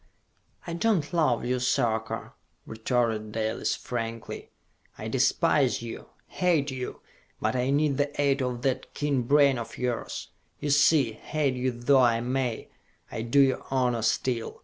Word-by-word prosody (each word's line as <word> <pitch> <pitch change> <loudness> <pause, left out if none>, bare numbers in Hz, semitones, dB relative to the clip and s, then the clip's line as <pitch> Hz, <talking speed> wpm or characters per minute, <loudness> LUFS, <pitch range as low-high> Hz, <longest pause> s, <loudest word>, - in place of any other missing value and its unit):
"I 170 - -5
do 220 +6 +2
not 155 -1 -3
love 150 -9 +2
you, 125 +1 0
Sarka!" 120 -3 -1 0.3
retorted 110 -1 -1
Dalis 110 0 -1
frankly. 115 -2 -5 0.5
"I 110 - -6
despise 130 +1 +2
you! 115 - -7 0.2
Hate 160 -6 +1
you! 130 -1 -6 0.4
But - - 0
I 125 +1 0
need 145 0 +2
the 145 0 -1
aid 140 -1 +2
of 125 -1 -3
that 130 -1 -2
keen 145 -3 0
brain 140 +1 +4
of 115 - -7
yours! 125 -2 -3 0.3
You 145 - -1
see, 145 -3 +4
hate 140 +4 -1
you 130 +1 -1
though 125 +3 +3
I 120 -2 +4
may, 125 -1 -2 0.4
I - - -4
do 120 +5 +2
you 135 -1 +2
honor 125 -3 +1
still. 115 +1 -1
130 Hz, 150 wpm, -27 LUFS, 120-140 Hz, 0.5 s, brain